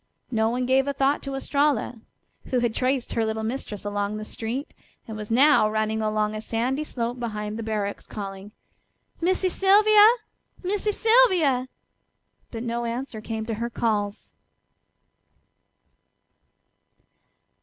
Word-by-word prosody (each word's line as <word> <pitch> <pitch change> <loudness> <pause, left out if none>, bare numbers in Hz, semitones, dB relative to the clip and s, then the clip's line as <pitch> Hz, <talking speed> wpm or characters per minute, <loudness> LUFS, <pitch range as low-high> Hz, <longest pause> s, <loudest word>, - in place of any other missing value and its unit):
No 220 -1 +2
one 250 +2 -1
gave 265 +2 +3
a 280 - 0
thought 275 +1 +1
to 275 -1 -5
Estralla, 280 -4 0 0.4
who 255 - -1
had 240 -2 +1
traced 255 +1 -1
her 230 - +1
little 220 0 -2
mistress 220 -3 -5
along 205 0 -2
the 215 - -6
street, 240 +7 -5 0.3
and 220 - -6
was 210 -1 -6
now 260 -1 +5
running 215 0 -1
along 215 0 0
a 215 - -4
sandy 245 +6 -1
slope 245 -4 -4
beyond 210 -3 -4
the - - -2
barracks 210 -2 -3
calling: 195 -1 -7 0.7
"Missy 370 +2 +2
Sylvia! 415 +3 +6 0.6
Missy 410 +3 0
Sylvia!" 375 - +4 0.8
But 230 -1 -6
no 235 0 -2
answer 235 -1 -4
came 220 0 -4
to 225 - -3
her 235 - -1
calls. 210 -3 -2
235 Hz, 135 wpm, -25 LUFS, 215-275 Hz, 0.8 s, Sylvia